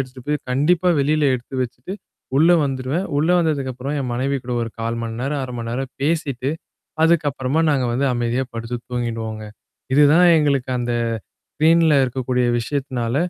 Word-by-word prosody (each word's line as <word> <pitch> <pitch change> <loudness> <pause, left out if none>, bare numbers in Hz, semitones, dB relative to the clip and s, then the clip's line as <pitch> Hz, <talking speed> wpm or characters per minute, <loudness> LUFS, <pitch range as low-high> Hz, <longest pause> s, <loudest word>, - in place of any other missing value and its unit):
எடுத்துட்டு 130 -1 -7
போய் 150 0 0
கண்டிப்பா 165 +7 +2
வெளில 150 +2 +2
எடுத்து 125 +2 -7
வச்சுட்டு 125 +8 -6 0.4
உள்ள 160 +5 +5
வந்துருவேன். 135 +6 -2
உள்ள 155 +4 +1
வந்ததுக்கப்புறம் 140 -4 -1
என் 125 -2 -3
மனைவி 135 +3 0
கூட 125 - -4
ஒரு 115 - -4
1/4 115 +1 -2
மணி 115 -1 -4
நேரம், 140 +2 -2
1/2 125 - -5
மணி 115 -1 -4
நேரம் 130 +2 -3
பேசிட்டு. 140 -4 -1 0.5
அதுக்கப்புறமா 145 -4 +1
நாங்க 140 -3 +2
வந்து 135 +3 +1
அமைதியா 120 +2 0
படுத்து 115 +1 -4
தூங்கிடுவோங்க. 115 -3 -3 0.5
இதுதான் 150 +5 +6
எங்களுக்கு 140 -4 +1
அந்த 120 0 -1 0.6
ஸ்க்ரீன்ல 160 +1 +4
இருக்கக்கூடிய 125 0 -1
விஷயத்தினால, 125 -2 -2
130 Hz, 150 wpm, -21 LUFS, 120-150 Hz, 0.6 s, இதுதான்